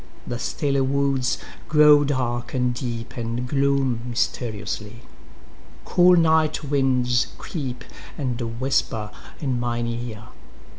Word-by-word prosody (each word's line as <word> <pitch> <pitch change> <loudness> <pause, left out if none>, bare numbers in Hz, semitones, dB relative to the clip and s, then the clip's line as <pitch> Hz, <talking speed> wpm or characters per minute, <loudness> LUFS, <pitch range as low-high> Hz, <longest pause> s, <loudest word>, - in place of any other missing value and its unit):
The 120 - -4
stilly 140 +2 -1
woods8Grow 140 +2 +3
dark 125 -3 -2
and 125 -1 +1
deep, 120 -1 -5
and 120 +1 -3
gloom 135 -2 +1
mysteriously.9Cool 115 - -1
night 160 -1 +3
winds 130 -4 +2
creep, 130 -7 -5 0.3
and 120 -4 -3
whisper 115 -5 0 0.3
in 130 -4 -1
mine 120 -1 -1
ear. 115 -2 -5
125 Hz, 95 wpm, -23 LUFS, 120-140 Hz, 0.3 s, woods8Grow